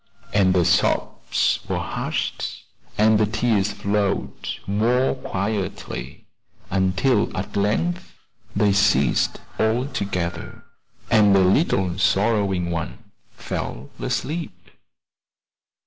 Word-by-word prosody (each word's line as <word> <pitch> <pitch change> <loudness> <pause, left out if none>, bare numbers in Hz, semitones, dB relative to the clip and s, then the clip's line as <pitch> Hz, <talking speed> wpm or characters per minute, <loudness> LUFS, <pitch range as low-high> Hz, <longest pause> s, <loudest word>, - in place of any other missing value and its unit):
And 95 -2 +4
the 90 -2 +3
sobs 90 0 +1
were - - 0
hushed - - -3 0.3
the 110 0 +4
tears 110 -3 +1
flowed 100 0 -2 0.2
more 120 +6 +2
quietly, 100 - -4 0.5
until 95 +5 +2
at 100 +3 -5
length 165 - 0 0.4
they 100 0 +3
ceased 100 - +2 0.2
altogether, 105 - -2 0.5
and 105 -3 +6
the 95 - +5
little 95 - +2
sorrowing 95 -1 +1
one 90 +6 -5 0.2
fell 65 +3 -5
asleep. 165 +3 -4
100 Hz, 85 wpm, -23 LUFS, 95-110 Hz, 0.5 s, and